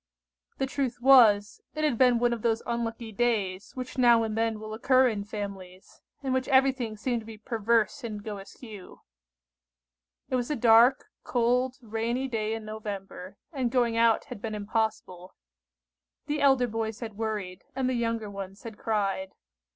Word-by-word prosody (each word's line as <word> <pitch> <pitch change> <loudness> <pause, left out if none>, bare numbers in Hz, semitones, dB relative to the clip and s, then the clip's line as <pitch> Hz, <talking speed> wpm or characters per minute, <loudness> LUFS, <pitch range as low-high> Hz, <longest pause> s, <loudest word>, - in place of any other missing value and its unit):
The 270 - 0
truth 265 -2 -3
was, 230 -6 +5
it 310 - -2
had 295 -5 +2
been 250 0 +4
one 240 0 +2
of 235 - -5
those 225 0 0
unlucky 235 -1 -3
days 205 -4 -1
which 255 0 -6
now 235 -2 +5
and 220 -1 -3
then 225 -1 0
will 215 0 -7
occur 255 +3 +4
in 210 -4 -2
families, 195 -3 -8 0.2
in 265 -1 -1
which 260 0 0
everything 260 -5 +2
seemed 235 +2 -1
to - - -14
be 225 -1 -9
perverse 230 +3 0
and 210 -3 -5
go 210 -2 -5
askew. 200 0 -12 1.3
It 255 - +2
was 245 -1 -2
a 300 - 0
dark, 235 +2 +5 0.2
cold, 250 +2 +1
rainy 230 +4 -2
day 220 -3 -2
in 220 -1 -7
November, 200 -3 -7 0.2
and 260 -4 -1
going 240 -2 +1
out 230 -1 +3
had 235 -5 -9
been 220 -2 -4
impossible. 205 -4 -3 0.9
The 295 +1 -2
elder 270 -3 +4
boys 225 -1 -4
had 225 -2 -5
worried, 210 -4 -4
and 265 -1 0
the 255 - 0
younger 230 -2 -1
ones 195 -1 -8
had 225 -3 -9
cried. 195 -3 -1
225 Hz, 165 wpm, -28 LUFS, 210-245 Hz, 1.3 s, was